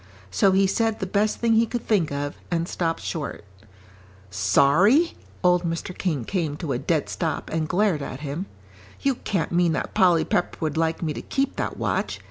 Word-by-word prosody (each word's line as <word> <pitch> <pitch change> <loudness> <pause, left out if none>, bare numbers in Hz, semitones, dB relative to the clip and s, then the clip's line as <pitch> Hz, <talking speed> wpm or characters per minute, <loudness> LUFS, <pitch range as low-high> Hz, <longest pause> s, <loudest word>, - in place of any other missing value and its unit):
So 195 - +4
he 195 +1 +4
said 225 +3 0
the 190 - -2
best 205 +3 +1
thing 230 -1 +2
he 225 +1 +4
could 240 +1 -4
think 190 -9 +2
of, 145 0 -3 0.2
and 170 -1 -1
stopped 165 -2 -2
short. 145 -9 -4 0.9
"Sorry?" 145 - +4 0.3
Old 180 -1 +4
Mr. 170 +1 -4
King 150 -10 -2
came 160 -7 -2
to 155 -4 -4
a - - -2
dead - - 0
stop - - -3
and 160 -1 -1
glared 185 -4 +2
at 135 0 -6
him. 150 +6 -4 0.5
"You 275 - +2
can't 195 -8 -2
mean 170 -1 +3
that - - -3
Polly 180 -5 +4
Pepper 175 - 0
would 155 -3 -2
like 165 +1 0
me 155 -2 -1
to - - -6
keep 275 0 -1
that - - -2
watch. - - -1
175 Hz, 190 wpm, -24 LUFS, 155-200 Hz, 0.9 s, So